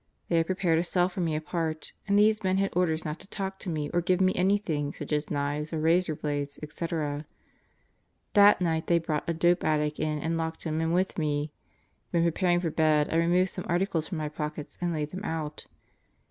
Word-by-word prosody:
They 170 - +3
had 165 0 +2
prepared 180 -4 +2
a - - +1
cell 180 +1 +2
for 185 0 -4
me 165 -3 0
apart, 155 0 -3 0.2
and 200 0 +3
these 215 +1 +4
men 190 0 +2
had 195 -2 0
orders 165 -3 +1
not 155 +2 -4
to 190 - -8
talk 195 -1 -4
to 190 - -5
me 155 -3 -2
or 175 - +2
give 180 +1 +1
me 185 0 +3
anything 180 -7 0
such - - -7
as 150 0 0
knives 145 +1 -2
or 160 - -2
razor 165 +1 +2
blades, 145 -1 -3
etc. 150 -2 -3 1.1
That 205 -1 +7
night 160 -2 0
they 170 - +4
brought 160 -1 -2
a - - +2
dope 175 +2 +3
addict 150 -1 0
in 155 0 0
and 165 +2 -1
locked 160 0 -3
him 160 -1 -1
in 165 0 0
with 185 +1 0
me. 150 -1 -1 0.6
When 170 -2 +2
preparing 175 +1 +2
for 165 -3 -1
bed 155 -1 +2
I - - +3
removed 175 +2 +3
some 185 - -5
articles 175 -2 0
from 180 - -4
my 155 -1 -2
pockets 150 0 -5
and 175 -1 0
laid 150 -2 -2
them 185 +2 -6
out. 155 -5 -4
165 Hz, 215 wpm, -28 LUFS, 155-180 Hz, 1.1 s, That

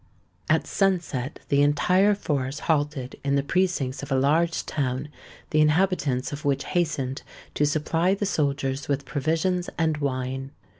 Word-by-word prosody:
At - - +3
sunset 170 -9 -1
the 140 -1 +4
entire 180 +8 +4
force 140 -6 -2
halted 145 -5 -1
in 140 0 +1
the 140 - +2
precincts 165 -5 0
of 140 - -8
a - - +3
large 160 +5 +2
town, 135 0 -2 0.4
the 155 - +4
inhabitants 150 -4 +1
of 145 +3 -6
which 140 -1 +1
hastened 150 -7 -1 0.3
to 150 - +2
supply 165 +5 +1
the 205 - -2
soldiers 140 -6 -1
with 140 -1 -1
provisions 165 +5 0
and 160 -2 +1
wine. 135 -1 -3
145 Hz, 145 wpm, -25 LUFS, 135-170 Hz, 0.4 s, the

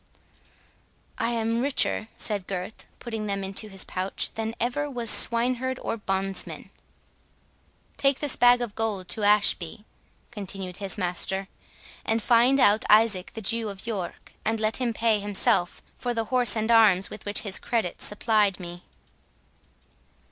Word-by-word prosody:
"I 230 - +1
am 230 0 -1
richer," 265 -4 +1
said 205 -4 -3
Gurth, 190 +2 -6
putting 225 -3 -5
them 200 -1 -3
into 195 +3 -1
his 195 -1 -2
pouch, 185 +1 -2
"than 225 0 -4
ever 290 +5 -1
was 240 -4 +2
swineherd 250 +2 +3
or - - -4
bondsman." 195 -2 -3 1.3
"Take 275 -1 +2
this 290 -3 +4
bag 245 0 +5
of 225 -4 -6
gold 210 -5 -3
to 220 - 0
Ashby," 205 -1 +2 0.5
continued 195 -4 -6
his 195 +1 0
master, 190 +1 -2 0.5
"and 225 +1 0
find 240 +4 +3
out 210 -3 +4
Isaac 210 -4 +3
the 225 - -6
Jew 230 +1 0
of 195 -1 -9
York, 205 -7 -6
and 220 0 -1
let 215 0 0
him 250 -2 -1
pay 225 -1 +1
himself 200 -3 0 0.2
for 245 -1 -3
the 225 -1 -1
horse 245 -4 +4
and 220 +1 -1
arms 205 -5 +4
with - - -8
which 205 0 -1
his 200 -3 -2
credit 225 -7 -2
supplied 210 -2 +1
me." 175 -1 -9
215 Hz, 150 wpm, -25 LUFS, 195-235 Hz, 1.3 s, bag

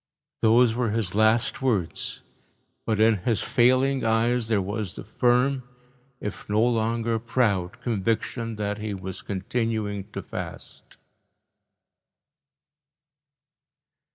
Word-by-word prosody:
Those 115 +1 +5
were 120 -1 0
his 105 -4 -1
last 110 +4 +2
words, 105 -11 -1 0.6
but 110 -2 +1
in 110 0 +5
his 105 +1 0
failing 130 +2 +3
eyes 115 +1 +2
there 110 -3 +2
was 100 0 -3
the - - -7
firm, 125 +5 +2 0.6
if 105 0 -6
no 110 +3 +3
longer 115 0 0
proud, 105 -6 0
conviction 115 +1 -1
that 105 0 -3
he 105 -1 -3
was 95 -1 -6
continuing 105 0 -2
to - - -5
fast. - - -8
110 Hz, 105 wpm, -25 LUFS, 105-120 Hz, 0.6 s, Those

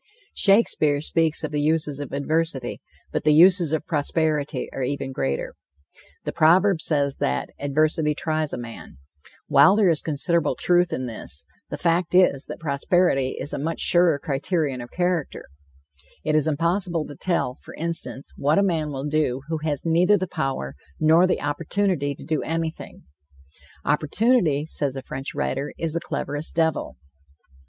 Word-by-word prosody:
Shakespeare 195 -8 +3
speaks 160 +1 0
of 155 - -3
the 150 -1 -1
uses 150 -2 0
of 145 - -6
adversity; 140 -2 -2 0.3
but - - -2
the 150 -1 +4
uses 175 -1 +6
of 160 -1 -1
prosperity 150 -3 -1
are - - -4
even 135 +1 -2
greater. 70 - -2 0.7
The - - -3
proverb 175 +2 +4
says 140 -4 +1
that 65 0 -1
"adversity 150 +2 +1
tries 155 -1 -1
a - - -3
man." 115 - -9 0.5
While 145 +8 +6
there 205 -4 +4
is 160 -2 +1
considerable 165 +2 0
truth 175 -1 +2
in 130 - -2
this, 110 -11 -6 0.2
the - - -4
fact 175 +1 +1
is 180 -7 +4
that - - -8
prosperity 140 -2 +1
is 145 - -4
a - - -2
much 160 +3 -3
surer 175 -3 +4
criterion 140 -1 -2
of 120 - -9
character. 175 -4 -2 0.8
It 155 - 0
is 155 0 +4
impossible 170 +1 0
to 145 - -9
tell, 150 -6 -1
for - - -11
instance, 165 -4 -2
what 145 +3 +2
a 200 - +4
man 165 -6 0
will 135 -1 -5
do 150 -4 0
who 160 -1 -1
has 150 -1 -2
neither 175 +5 +4
the 185 - -2
power 135 - -3 0.3
nor 160 +4 +5
the - - 0
opportunity 145 0 -1
to - - -11
do 155 -3 -1
anything. 165 0 -4 0.8
"Opportunity," 160 - +2
says 145 -4 -2
a 135 - -6
French 135 +2 -6
writer, 140 0 -2
"is 165 -2 -2
the 170 - 0
cleverest 145 +2 -4
devil." 160 -2 0
155 Hz, 160 wpm, -23 LUFS, 140-170 Hz, 0.8 s, uses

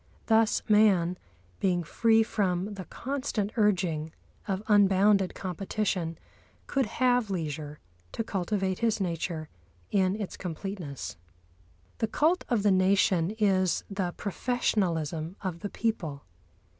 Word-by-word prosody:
Thus 225 -1 +3
man, 200 -5 +4 0.4
being 180 -3 +1
free 225 +7 +3
from 195 -2 -1
the 190 -2 -7
constant 255 -6 -3
urging 180 -8 +1 0.4
of 195 0 -2
unbounded 200 -1 +4
competition, 185 -2 -2 0.5
could 270 -4 0
have 245 -3 +3
leisure 150 -4 -4 0.4
to - - -2
cultivate 190 -2 -1
his 225 -2 +1
nature 165 -3 -2 0.4
in 190 -1 +2
its 205 - -5
completeness. 175 - -5 0.8
The 225 - +1
Cult 325 +10 +2
of 230 -5 +1
the 205 - +4
Nation 185 -2 +3
is 190 -4 +2
the 190 -3 -1
professionalism 175 - -1
of 180 -3 -3
the 205 - -4
people. 165 -13 -2
195 Hz, 115 wpm, -28 LUFS, 175-215 Hz, 0.8 s, man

